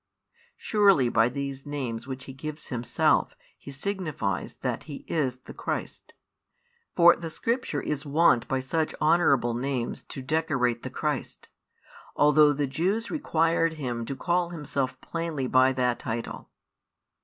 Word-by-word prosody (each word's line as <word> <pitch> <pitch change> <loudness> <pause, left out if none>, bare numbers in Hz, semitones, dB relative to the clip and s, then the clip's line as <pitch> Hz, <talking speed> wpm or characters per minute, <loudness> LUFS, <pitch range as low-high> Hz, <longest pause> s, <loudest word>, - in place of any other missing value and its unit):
Surely 195 - +4
by 115 0 +3
these 135 0 -5
names 130 -5 -4
which 130 -1 -6
He 135 - -9
gives 155 +3 -7
Himself, 120 -2 +1 0.2
He - - -12
signifies 140 - -3
that - - -2
He 145 -3 -9
is 135 -6 0
the - - -11
Christ. - - -5 0.8
For 170 -1 +7
the 165 -1 -6
Scripture 230 - -1
is 145 -2 -2
wont 145 -5 +3
by 130 -1 0
such 155 +4 -1
honourable 150 -7 +3
names 125 0 -2
to 135 - -8
decorate 130 -5 0
the 130 - -5
Christ, 150 0 -4 0.7
although 150 0 +6
the 145 0 0
Jews 185 - -1
required 165 - +1
Him 125 -6 -3
to 135 - -4
call 175 +3 0
Himself 140 -5 -3
plainly 165 -5 -3
by 130 +1 +4
that 125 -2 0
title. 115 +1 -5
140 Hz, 140 wpm, -27 LUFS, 130-165 Hz, 0.8 s, For